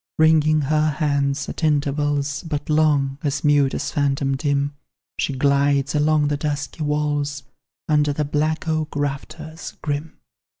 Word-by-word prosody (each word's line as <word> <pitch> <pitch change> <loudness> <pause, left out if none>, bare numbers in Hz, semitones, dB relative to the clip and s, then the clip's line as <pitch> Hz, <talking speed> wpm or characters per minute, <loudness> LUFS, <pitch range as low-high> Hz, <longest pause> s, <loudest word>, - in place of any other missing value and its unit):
Wringing 155 -1 +4
her 155 +2 +2
hands, 140 -2 0
at - - -6
intervals 145 -1 0
But 155 -3 -4
long 145 -3 +2
as 145 -1 -2
mute 145 -2 +3
as - - -3
phantom 140 -1 0
dim 140 0 0 0.5
She - - 0
glides 140 +1 +2
along 150 0 +2
the 145 - 0
dusky 145 +1 -3
walls, 145 -1 -1 0.4
Under 150 -1 +3
the 150 +1 -1
black 155 +3 -1
oak 155 -1 -1
rafters 145 +3 -5
grim. 150 +1 -3
145 Hz, 135 wpm, -22 LUFS, 140-155 Hz, 0.5 s, Wringing